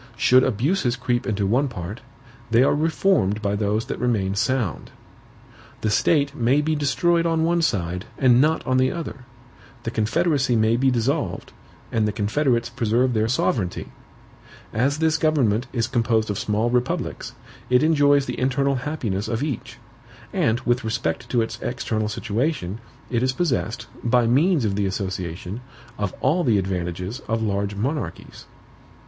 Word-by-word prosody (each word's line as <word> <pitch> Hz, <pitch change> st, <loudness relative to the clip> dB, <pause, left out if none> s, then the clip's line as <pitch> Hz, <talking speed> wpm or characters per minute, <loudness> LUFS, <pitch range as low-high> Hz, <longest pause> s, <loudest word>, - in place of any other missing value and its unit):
Should 130 Hz, +2 st, +5 dB
abuses 125 Hz, -, +1 dB
creep 125 Hz, -1 st, -1 dB
into 105 Hz, -3 st, 0 dB
one 125 Hz, +8 st, +2 dB
part, 105 Hz, -2 st, -7 dB, 0.5 s
they 115 Hz, +2 st, +5 dB
are -, -, +3 dB
reformed 150 Hz, -, +1 dB
by 100 Hz, -1 st, -1 dB
those 105 Hz, +2 st, 0 dB
that -, -, -5 dB
remain 105 Hz, -6 st, 0 dB
sound. 115 Hz, -1 st, -1 dB, 0.9 s
The 110 Hz, -, 0 dB
state 140 Hz, +4 st, +2 dB
may 130 Hz, +1 st, +2 dB
be 155 Hz, +1 st, 0 dB
destroyed 170 Hz, +3 st, +2 dB
on 165 Hz, -1 st, +1 dB
one 170 Hz, +1 st, +2 dB
side, 90 Hz, -, -1 dB
and 125 Hz, -2 st, +5 dB
not 155 Hz, +2 st, +1 dB
on 130 Hz, 0 st, +1 dB
the 130 Hz, 0 st, +3 dB
other; 150 Hz, -6 st, -6 dB, 0.6 s
the 115 Hz, -, -3 dB
confederacy 135 Hz, +3 st, +1 dB
may 110 Hz, +1 st, +3 dB
be 135 Hz, +2 st, +2 dB
dissolved, 125 Hz, -, -1 dB, 0.4 s
and 110 Hz, -1 st, +1 dB
the -, -, 0 dB
confederates 115 Hz, +3 st, 0 dB
preserve 120 Hz, +1 st, +1 dB
their 110 Hz, 0 st, +1 dB
sovereignty." 110 Hz, -6 st, -1 dB, 0.8 s
"As 135 Hz, +6 st, +1 dB
this 160 Hz, 0 st, +1 dB
government 130 Hz, -7 st, +2 dB
is 115 Hz, -3 st, 0 dB
composed 115 Hz, -3 st, +1 dB
of 100 Hz, -, -3 dB
small 110 Hz, +2 st, 0 dB
republics, 125 Hz, 0 st, -2 dB, 0.4 s
it 125 Hz, +3 st, +4 dB
enjoys 145 Hz, -3 st, +4 dB
the -, -, -4 dB
internal 135 Hz, +1 st, +1 dB
happiness 125 Hz, -8 st, -3 dB
of 115 Hz, +3 st, -2 dB
each; 145 Hz, -7 st, -4 dB, 0.6 s
and 110 Hz, +2 st, +1 dB
with 120 Hz, -1 st, 0 dB
respect 95 Hz, -7 st, -2 dB
to 120 Hz, -2 st, +2 dB
its 115 Hz, -, -6 dB
external 110 Hz, -3 st, -2 dB
situation, 110 Hz, -, -2 dB, 0.3 s
it 120 Hz, -2 st, +1 dB
is 130 Hz, 0 st, +1 dB
possessed, 125 Hz, -7 st, -1 dB, 0.2 s
by 120 Hz, 0 st, +3 dB
means 145 Hz, +4 st, +3 dB
of 100 Hz, -, 0 dB
the 100 Hz, -1 st, 0 dB
association, 95 Hz, +1 st, -4 dB, 0.4 s
of 105 Hz, -3 st, -1 dB
all 160 Hz, +7 st, +2 dB
the 115 Hz, -6 st, +3 dB
advantages 90 Hz, +3 st, -3 dB
of 115 Hz, 0 st, -1 dB
large 100 Hz, -1 st, -1 dB
monarchies." 120 Hz, -, -4 dB
120 Hz, 155 wpm, -23 LUFS, 105-140 Hz, 0.9 s, Should